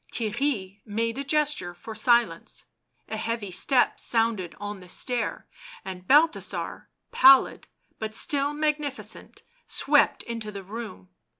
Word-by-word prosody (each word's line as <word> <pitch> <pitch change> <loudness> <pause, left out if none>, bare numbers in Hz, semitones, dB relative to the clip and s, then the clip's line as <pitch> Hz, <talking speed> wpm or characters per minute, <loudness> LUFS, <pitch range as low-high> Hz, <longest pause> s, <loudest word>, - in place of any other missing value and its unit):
Theirry 215 -4 -1
made 230 +4 -2
a - - -2
gesture 280 - 0
for 220 - -9
silence; 235 +2 +1 0.4
a 220 - -4
heavy 220 -3 -3
step 250 +7 +2
sounded 225 -6 0
on 205 -1 -5
the 180 -1 -14
stair, 245 +5 -3 0.4
and 185 -1 -8
Balthasar, 310 +3 +2 0.2
pallid 265 0 +6 0.3
but 220 0 -4
still 285 +2 +1
magnificent, 300 -2 -3 0.2
swept - - +2
into 230 -2 -5
the 200 -1 -8
room. 195 - -8
230 Hz, 120 wpm, -26 LUFS, 205-275 Hz, 0.4 s, pallid